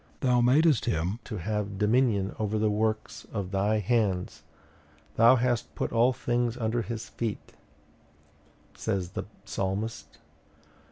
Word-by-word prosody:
'Thou 125 Hz, -2 st, +3 dB
madest 145 Hz, +3 st, +4 dB
him 95 Hz, 0 st, -1 dB
to 105 Hz, -, -6 dB
have 100 Hz, +2 st, -3 dB
dominion 105 Hz, -2 st, +2 dB
over 110 Hz, 0 st, 0 dB
the 105 Hz, 0 st, +2 dB
works 110 Hz, +1 st, -2 dB
of 100 Hz, -4 st, -4 dB
thy 100 Hz, +2 st, +1 dB
hands; 105 Hz, -3 st, 0 dB, 0.7 s
thou 115 Hz, +3 st, +7 dB
hast 120 Hz, -2 st, -1 dB
put -, -, -2 dB
all 120 Hz, +2 st, +4 dB
things 120 Hz, -1 st, -1 dB
under 115 Hz, 0 st, 0 dB
his 115 Hz, -1 st, -5 dB
feet,' 115 Hz, -3 st, -5 dB, 1.2 s
says 95 Hz, -2 st, -2 dB
the -, -, -4 dB, 0.2 s
Psalmist. 100 Hz, +4 st, -3 dB
110 Hz, 125 wpm, -28 LUFS, 100-120 Hz, 1.2 s, thou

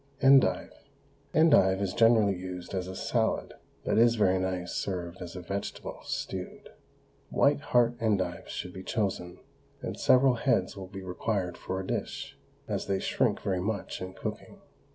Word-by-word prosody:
ENDIVE. 135 Hz, 0 st, +5 dB, 0.6 s
Endive 145 Hz, -, +5 dB
is 100 Hz, -2 st, -1 dB
generally 115 Hz, -4 st, +5 dB
used 90 Hz, 0 st, -7 dB
as 90 Hz, -1 st, -2 dB
a 95 Hz, -, -6 dB
salad, 110 Hz, +3 st, 0 dB, 0.3 s
but -, -, +2 dB
is 115 Hz, 0 st, +5 dB
very 95 Hz, -4 st, +3 dB
nice 90 Hz, -1 st, -2 dB
served 90 Hz, -2 st, -3 dB
as 90 Hz, 0 st, -7 dB
a 90 Hz, -, -5 dB
vegetable, 100 Hz, +3 st, -5 dB
stewed. 95 Hz, -1 st, -5 dB, 0.6 s
White 145 Hz, +1 st, +3 dB
heart 120 Hz, -3 st, +2 dB
endives 100 Hz, -6 st, 0 dB
should 90 Hz, -, -5 dB
be 95 Hz, -, -7 dB
chosen, 95 Hz, -4 st, -2 dB, 0.4 s
and -, -, -5 dB
several 130 Hz, 0 st, +5 dB
heads 95 Hz, -5 st, +1 dB
will 95 Hz, -2 st, -7 dB
be 95 Hz, 0 st, -8 dB
required 90 Hz, 0 st, -2 dB
for 95 Hz, -, -4 dB
a 95 Hz, -, -4 dB
dish, -, -, -4 dB, 0.3 s
as -, -, -2 dB
they 100 Hz, -1 st, +1 dB
shrink -, -, 0 dB
very 95 Hz, -2 st, -1 dB
much 100 Hz, +1 st, -3 dB
in 95 Hz, 0 st, -5 dB
cooking. -, -, -6 dB
95 Hz, 155 wpm, -29 LUFS, 90-115 Hz, 0.6 s, ENDIVE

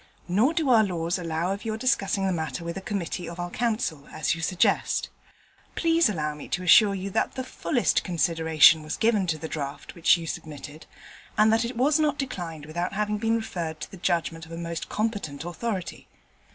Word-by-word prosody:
Nor 220 Hz, -, +2 dB
do 320 Hz, -4 st, +1 dB
our 225 Hz, -2 st, +6 dB
laws 175 Hz, -2 st, -1 dB
allow 165 Hz, +1 st, -1 dB
of 200 Hz, -, -7 dB
your 220 Hz, -1 st, -2 dB
discussing 205 Hz, -5 st, +1 dB
the 190 Hz, -, +1 dB
matter 160 Hz, -2 st, -3 dB
with 170 Hz, 0 st, -4 dB
a 195 Hz, -, -5 dB
Committee 180 Hz, -3 st, -4 dB
of 170 Hz, +1 st, -9 dB
our 175 Hz, 0 st, -4 dB
Council, 215 Hz, -, -2 dB
as 155 Hz, -, 0 dB
you 165 Hz, -, -5 dB
suggest. 180 Hz, +2 st, +1 dB, 0.7 s
Please 330 Hz, -3 st, +3 dB
allow 150 Hz, -6 st, -2 dB
me 150 Hz, -, -9 dB
to 180 Hz, -, -2 dB
assure 200 Hz, +3 st, +6 dB
you 195 Hz, +1 st, -4 dB
that -, -, 0 dB
the 260 Hz, -, -3 dB
fullest 255 Hz, 0 st, 0 dB
consideration 160 Hz, -3 st, +4 dB
was 155 Hz, 0 st, -4 dB
given 215 Hz, -4 st, +2 dB
to 160 Hz, -2 st, 0 dB
the 160 Hz, -, -6 dB
draft 140 Hz, -2 st, -5 dB
which 170 Hz, +1 st, +4 dB
you 170 Hz, -, -6 dB
submitted, 150 Hz, -1 st, -7 dB, 0.5 s
and 215 Hz, +1 st, +5 dB
that 225 Hz, +1 st, +2 dB
it 240 Hz, 0 st, -5 dB
was 285 Hz, +5 st, +3 dB
not 300 Hz, -1 st, +1 dB
declined 170 Hz, -, -5 dB
without 175 Hz, +4 st, -3 dB
having 210 Hz, +1 st, -1 dB
been 225 Hz, +1 st, +1 dB
referred 175 Hz, -8 st, -4 dB
to -, -, -6 dB
the 195 Hz, -, -10 dB
judgement 165 Hz, -2 st, -1 dB
of -, -, -15 dB
a 165 Hz, -, -6 dB
most 170 Hz, -1 st, -5 dB
competent 205 Hz, -10 st, -2 dB
authority. 185 Hz, +2 st, -4 dB
180 Hz, 200 wpm, -26 LUFS, 165-220 Hz, 0.7 s, our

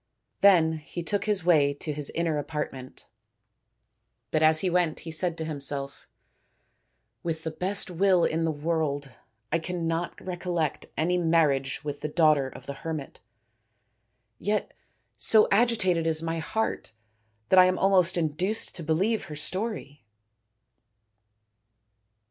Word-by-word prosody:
Then 165 Hz, -5 st, +5 dB
he 170 Hz, +3 st, -7 dB
took 200 Hz, +3 st, -1 dB
his 205 Hz, -5 st, +1 dB
way 145 Hz, -5 st, +4 dB
to 150 Hz, +1 st, -4 dB
his 145 Hz, -1 st, -2 dB
inner 165 Hz, -3 st, 0 dB
apart 150 Hz, +1 st, -3 dB
ment, 130 Hz, -1 st, -11 dB, 1.3 s
but 155 Hz, -, +1 dB
as 155 Hz, 0 st, +5 dB
he 190 Hz, -, 0 dB
went 175 Hz, -3 st, +1 dB
he 165 Hz, -, -7 dB
said 170 Hz, +1 st, 0 dB
to 160 Hz, -, -3 dB
himself: 140 Hz, -2 st, -5 dB, 1.1 s
"With 160 Hz, -1 st, -3 dB
the 160 Hz, -, -3 dB
best 185 Hz, +3 st, -2 dB
will 180 Hz, 0 st, +3 dB
in 165 Hz, +1 st, 0 dB
the 165 Hz, -, +1 dB
world, 145 Hz, -3 st, -2 dB, 0.4 s
I 165 Hz, -, +2 dB
cannot 170 Hz, 0 st, -3 dB
recollect 175 Hz, -4 st, -3 dB
any 180 Hz, +3 st, +1 dB
marriage 155 Hz, -6 st, +1 dB
with 145 Hz, -1 st, -5 dB
the -, -, -2 dB
daughter 150 Hz, -4 st, +3 dB
of 130 Hz, 0 st, -12 dB
the 140 Hz, -, -5 dB
hermit. 155 Hz, -4 st, -5 dB, 1.2 s
Yet 210 Hz, +1 st, -1 dB, 0.4 s
so 220 Hz, -1 st, +4 dB
agitated 200 Hz, -7 st, +2 dB
is 160 Hz, 0 st, 0 dB
my 165 Hz, 0 st, -2 dB
heart 220 Hz, -, -3 dB, 0.6 s
that 190 Hz, -, +7 dB
I 185 Hz, -, +9 dB
am 185 Hz, 0 st, +1 dB
almost 185 Hz, -2 st, +3 dB
induced 175 Hz, +7 st, -1 dB
to 170 Hz, -, -6 dB
believe 190 Hz, +9 st, 0 dB
her 155 Hz, -, -8 dB
story." 150 Hz, -, -4 dB
165 Hz, 135 wpm, -27 LUFS, 150-180 Hz, 1.3 s, I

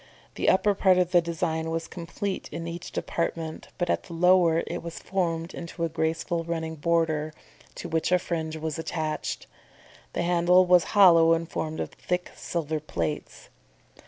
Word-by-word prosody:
The -, -, +1 dB
upper 205 Hz, +2 st, +4 dB
part 190 Hz, -2 st, +4 dB
of 180 Hz, -1 st, +2 dB
the 175 Hz, -1 st, +5 dB
design 165 Hz, -1 st, -2 dB
was 165 Hz, 0 st, -2 dB
complete 185 Hz, +3 st, -5 dB
in 165 Hz, -, -5 dB
each 170 Hz, +1 st, -6 dB
department, 165 Hz, -1 st, -3 dB
but 175 Hz, -, 0 dB
at -, -, 0 dB
the 170 Hz, -, -9 dB
lower, 175 Hz, -1 st, +4 dB
it -, -, -4 dB
was 170 Hz, 0 st, -7 dB
formed 170 Hz, -2 st, -2 dB
into 170 Hz, 0 st, -6 dB
a 165 Hz, -, +1 dB
graceful 165 Hz, +1 st, -1 dB
running 160 Hz, -1 st, -3 dB
border, 155 Hz, -1 st, 0 dB, 0.4 s
to -, -, -6 dB
which 160 Hz, +1 st, 0 dB
a 180 Hz, -, +6 dB
fringe 160 Hz, -3 st, -3 dB
was 155 Hz, 0 st, -4 dB
attached. 155 Hz, -2 st, -3 dB, 0.7 s
The -, -, -1 dB
handle 175 Hz, +1 st, +4 dB
was 180 Hz, -1 st, +5 dB
hollow 165 Hz, -4 st, +7 dB
and 165 Hz, 0 st, -1 dB
formed 160 Hz, -1 st, -4 dB
of -, -, -3 dB
thick 180 Hz, 0 st, -3 dB
silver 160 Hz, -2 st, -3 dB
plates. 85 Hz, -, -4 dB
165 Hz, 165 wpm, -26 LUFS, 160-175 Hz, 0.7 s, hollow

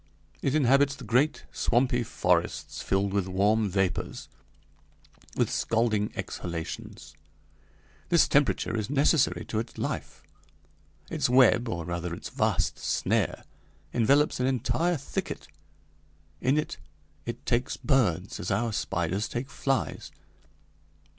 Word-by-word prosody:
It 135 Hz, +1 st, +1 dB
inhabits 140 Hz, 0 st, +4 dB
the -, -, -11 dB
great, 130 Hz, +6 st, +1 dB
swampy 125 Hz, 0 st, +1 dB
forests 90 Hz, -6 st, 0 dB
filled 95 Hz, 0 st, 0 dB
with 100 Hz, -2 st, 0 dB
warm 100 Hz, +3 st, +2 dB
vapors, 95 Hz, -1 st, -2 dB, 1.1 s
with -, -, +1 dB
scalding 110 Hz, -2 st, +1 dB
exhalations; 85 Hz, -2 st, -6 dB, 1.0 s
this 170 Hz, -2 st, +5 dB
temperature 145 Hz, -4 st, +2 dB
is 110 Hz, -2 st, -2 dB
necessary 145 Hz, +1 st, +2 dB
to 110 Hz, -, -2 dB
its 115 Hz, +1 st, -6 dB
life. -, -, -4 dB, 0.9 s
Its 140 Hz, -5 st, +1 dB
web, 125 Hz, -2 st, +5 dB
or 85 Hz, -7 st, -3 dB
rather 85 Hz, 0 st, -3 dB
its -, -, -8 dB
vast -, -, 0 dB
snare, -, -, 0 dB, 0.5 s
envelops 140 Hz, +6 st, +3 dB
an 125 Hz, -, +2 dB
entire 160 Hz, +7 st, +1 dB
thicket. 140 Hz, -, -5 dB, 0.9 s
In 130 Hz, +4 st, +2 dB
it 150 Hz, -, -2 dB, 0.5 s
it -, -, -5 dB
takes 120 Hz, +2 st, 0 dB
birds 100 Hz, -, +1 dB
as 90 Hz, -, -4 dB
our 110 Hz, +3 st, 0 dB
spiders 95 Hz, +2 st, -1 dB
take 125 Hz, +3 st, -4 dB
flies. 135 Hz, -7 st, -2 dB
115 Hz, 115 wpm, -28 LUFS, 95-135 Hz, 1.1 s, this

